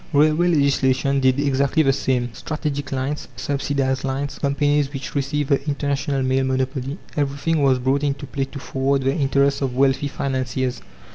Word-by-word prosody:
Railway 155 Hz, +4 st, +4 dB
legislation 140 Hz, -3 st, +2 dB
did 130 Hz, 0 st, +3 dB
exactly 140 Hz, +2 st, +2 dB
the 135 Hz, -1 st, +3 dB
same. 125 Hz, -3 st, -1 dB
Strategic 145 Hz, 0 st, -4 dB
lines, 135 Hz, +2 st, -2 dB
subsidized 135 Hz, -2 st, -1 dB
lines, 135 Hz, +1 st, -3 dB
companies 145 Hz, 0 st, +1 dB
which 135 Hz, -2 st, -6 dB
received 140 Hz, 0 st, -1 dB
the 140 Hz, -1 st, +2 dB
International 140 Hz, -1 st, -1 dB
Mail 130 Hz, +1 st, +1 dB
monopoly, 130 Hz, +2 st, -2 dB, 0.2 s
everything 145 Hz, +2 st, 0 dB
was 135 Hz, -2 st, +4 dB
brought 130 Hz, +3 st, +1 dB
into 145 Hz, -1 st, -2 dB
play 135 Hz, -1 st, -2 dB
to 140 Hz, -, -10 dB
forward 135 Hz, 0 st, -1 dB
the 135 Hz, +1 st, +2 dB
interests 140 Hz, -1 st, +2 dB
of 130 Hz, -2 st, -1 dB
wealthy 135 Hz, +2 st, +2 dB
financiers. 130 Hz, -2 st, -2 dB
140 Hz, 155 wpm, -22 LUFS, 130-145 Hz, 0.2 s, Railway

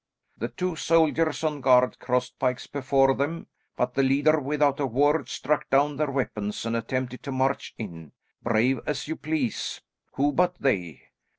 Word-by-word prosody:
The -, -, -3 dB
two 180 Hz, -2 st, -3 dB
soldiers 160 Hz, -1 st, +2 dB
on 150 Hz, -2 st, -1 dB
guard 125 Hz, -1 st, +4 dB
crossed 125 Hz, 0 st, -1 dB
pikes 125 Hz, -1 st, -1 dB
before 135 Hz, -1 st, +2 dB
them, 145 Hz, +5 st, -2 dB, 0.3 s
but 125 Hz, 0 st, 0 dB
the 135 Hz, -, +2 dB
leader, 145 Hz, +4 st, +3 dB
without 145 Hz, 0 st, +1 dB
a 140 Hz, -, +1 dB
word, 145 Hz, +4 st, +2 dB
struck 150 Hz, +2 st, -1 dB
down 140 Hz, +1 st, +2 dB
their 150 Hz, -1 st, 0 dB
weapons 110 Hz, -6 st, -3 dB
and 115 Hz, 0 st, -1 dB
attempted 125 Hz, +2 st, -3 dB
to 140 Hz, -, -6 dB
march 135 Hz, +1 st, -1 dB
in, 85 Hz, -8 st, -8 dB, 0.3 s
brave 115 Hz, +3 st, +2 dB
as 150 Hz, -1 st, -2 dB
you 160 Hz, -, -3 dB
please; 150 Hz, -7 st, -2 dB, 0.3 s
who 145 Hz, +2 st, +1 dB
but 180 Hz, +3 st, +2 dB
they! 90 Hz, -, -1 dB
135 Hz, 165 wpm, -26 LUFS, 125-150 Hz, 0.3 s, guard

